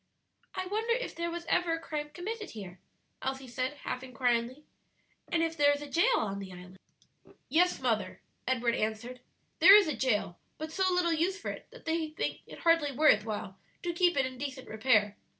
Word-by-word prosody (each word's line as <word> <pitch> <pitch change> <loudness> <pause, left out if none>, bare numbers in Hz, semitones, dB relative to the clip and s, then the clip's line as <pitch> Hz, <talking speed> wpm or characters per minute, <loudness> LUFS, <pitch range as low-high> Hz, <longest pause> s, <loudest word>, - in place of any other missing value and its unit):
"I 370 0 -2
wonder 440 +5 0
if - - -4
there 340 0 -3
was 340 0 -5
ever 345 -1 +2
a 330 - -1
crime 300 -2 -4
committed 415 +7 -5
here?" 190 -4 -9 0.4
Elsie 265 0 -3
said, 255 +3 -2
half 255 - -3
inquiringly. 250 +1 -1 0.7
"And 330 -1 +2
if 325 0 -1
there 290 -2 +5
is 285 - -4
a - - -7
jail 465 +9 +4
on 200 -2 -2
the 195 -1 -7
island?" 180 +1 -12 0.7
"Yes, 350 +6 +3
mother," 220 -7 -1 0.3
Edward 245 -2 +1
answered; 225 +3 -3 0.4
"there 390 - +10
is 415 -4 +6
a 305 - -1
jail, 215 -8 0 0.2
but 315 +1 -6
so 375 +1 +1
little 355 -2 +2
use 360 +5 0
for - - -4
it - - -10
that - - -15
they 320 0 0
think 310 - -3
it - - -11
hardly 330 -4 +3
worth 255 -7 +4
while 205 -3 -5 0.2
to 345 -1 -1
keep 350 -1 +2
it 270 - +3
in 255 -1 -7
decent 270 -2 -5
repair. 215 -2 +2
285 Hz, 195 wpm, -30 LUFS, 235-340 Hz, 0.7 s, there